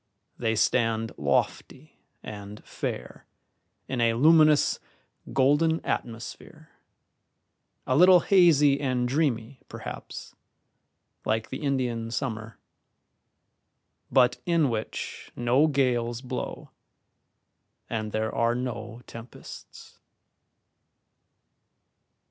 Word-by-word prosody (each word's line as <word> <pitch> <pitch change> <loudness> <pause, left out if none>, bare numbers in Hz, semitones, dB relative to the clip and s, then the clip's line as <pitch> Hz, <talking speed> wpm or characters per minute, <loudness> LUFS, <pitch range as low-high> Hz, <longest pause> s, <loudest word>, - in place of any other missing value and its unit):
They 115 -2 -1
stand 115 0 +1
lofty 70 -2 -2 0.2
and 105 0 -9
fair - - -6 0.6
in 130 -2 -2
a 115 -1 +3
luminous, 155 +2 +5 0.5
golden 145 +5 +3
atmosphere, 115 -1 -6 1.1
a 130 - +1
little 180 +3 +7
hazy 150 -8 +5
and 125 -3 0
dreamy, 130 -3 -1
perhaps, - - -8 0.9
like 110 0 -1
the 130 - -6
Indian 125 -5 -1
summer, 115 -3 -4 1.5
but 125 - +4
in 165 -6 +2
which 110 -1 -5
no 125 +6 +3
gales 125 -4 0
blow 130 - -6 1.2
and 110 -2 -3
there 110 +1 -2
are 115 0 +1
no 120 -1 -5
tempests. 115 +2 -12
125 Hz, 85 wpm, -26 LUFS, 115-140 Hz, 1.5 s, little